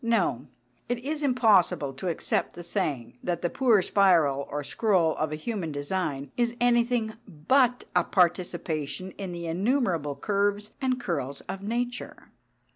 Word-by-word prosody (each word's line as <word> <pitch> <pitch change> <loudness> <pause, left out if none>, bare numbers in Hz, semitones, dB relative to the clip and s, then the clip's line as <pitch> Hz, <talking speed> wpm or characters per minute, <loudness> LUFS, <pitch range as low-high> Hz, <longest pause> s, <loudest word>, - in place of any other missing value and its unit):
No, 195 - +1 0.4
it 245 - 0
is 305 +1 -2
impossible 215 - +3
to 135 +8 -6
accept 170 - -1
the 175 - -8
saying 125 -7 -2
that 175 -1 -2
the 175 - 0
poor 230 -7 +4
spiral 165 -9 +3
or 145 0 -3
scroll 180 -2 +2
of 155 -1 -1
a - - -2
human 175 0 -4
design 145 -1 -3
is 240 -1 0
anything 240 -2 +2
but 245 - +2
a 180 - +5
participation 175 -1 0
in 195 -2 -6
the 170 -1 -5
innumerable 175 - 0
curves 205 +2 0
and 255 -1 0
curls 140 - -3
of 195 - -7
nature. 240 +4 -4
185 Hz, 145 wpm, -27 LUFS, 155-235 Hz, 0.4 s, a